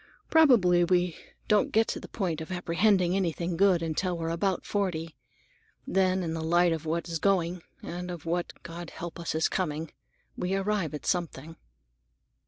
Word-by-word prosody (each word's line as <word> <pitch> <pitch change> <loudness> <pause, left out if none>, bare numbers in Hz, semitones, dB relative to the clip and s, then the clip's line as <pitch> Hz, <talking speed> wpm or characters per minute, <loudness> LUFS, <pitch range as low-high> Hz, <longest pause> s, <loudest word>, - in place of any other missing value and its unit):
Probably 225 - +6
we 175 -1 +2 0.3
don't 210 -1 +3
get 225 +1 +3
to - - -2
the - - -10
point 175 -7 -2
of 160 - -7
apprehending 180 +1 +2
anything 175 -2 -1
good 180 -2 +4
until 170 +3 -1
we're 165 0 -2
about 185 +3 -1
forty. 165 -6 -2 0.7
Then, 185 0 +2
in 165 -1 -2
the 165 - -3
light 175 +1 +3
of 160 0 -5
what 170 +2 -1
is 165 -1 -3
going, 180 -2 +1 0.2
and 180 +1 -5
of 175 -3 -7
what, 175 +1 -1
God 170 0 -7
help 170 0 -7
us! 170 -2 -3
is 160 - +3
coming, 160 -3 -2 0.4
we 180 +2 -1
arrive 195 -5 -1
at 150 - -8
understanding." 165 -3 -6
175 Hz, 170 wpm, -28 LUFS, 165-190 Hz, 0.7 s, Probably